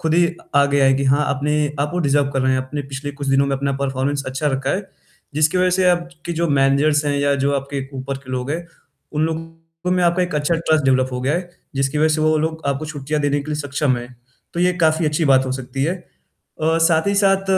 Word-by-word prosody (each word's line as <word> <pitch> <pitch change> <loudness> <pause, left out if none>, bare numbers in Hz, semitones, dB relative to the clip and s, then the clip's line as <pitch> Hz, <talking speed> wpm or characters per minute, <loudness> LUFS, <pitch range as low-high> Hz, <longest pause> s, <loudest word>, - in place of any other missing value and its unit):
खुद 160 0 0
ही 170 0 +2 0.2
आगे 140 0 +4
आए 135 0 +5
कि 135 +1 0
हाँ, 140 +3 +3
आपने 150 +1 0
आप 145 +1 0
वो 180 - 0
डिज़र्व 140 -2 +2
कर 135 - 0
रहे 130 0 +2
हैं, 130 - +2
आपने 145 +2 -5
पिछले 135 +1 -6
कुछ 140 0 -6
दिनों 135 +1 +3
में 135 - 0
अपना 140 0 -1
परफ़ॉर्मेंस 140 +1 -1
अच्छा 130 +3 -2
रखा 135 0 -1
है। 195 0 -2 0.5
जिसकी 155 +4 +2
वजह 185 0 +3
से 185 +1 +2
आपकी 175 -1 -3
जो 170 0 0
मैनेजर्स 145 +2 +3
हैं 145 - +1
या 140 0 +2
जो 140 - +2
आपके 140 0 -4
ऊपर 135 +1 -4
के 130 -1 -12
लोग 125 +2 -3
हैं, 170 +3 -3 0.5
उन 150 +1 +1
लोगों 165 +1 -6
में 180 -1 +2
आपका 175 +2 +3
एक 180 -3 -3
अच्छा 150 +3 +1
ट्रस्ट 160 -3 +1
डेवलप 130 -1 +3
हो 125 - -3
गया 140 +5 +1
है, 175 0 -3 0.2
जिसकी 135 +2 0
वजह 155 +1 +4
से 155 - -1
वो 155 0 +3
लोग 160 +1 -2
आपको 140 +2 -1
छुट्टियाँ 150 0 -3
देने 145 0 +1
के 150 - -7
लिए 150 0 -2
सक्षम 140 -2 0
है, 120 0 -8 0.5
तो 170 - -1
ये 180 0 +3
काफ़ी 160 0 +2
अच्छी 150 +2 0
बात 130 0 +3
हो 130 - -1
सकती 135 +2 -3
है। 170 - 0 0.7
अ, 160 +1 +2
साथ 160 +1 +2
ही 200 - +1
साथ 195 0 +3
145 Hz, 245 wpm, -20 LUFS, 135-160 Hz, 0.7 s, आए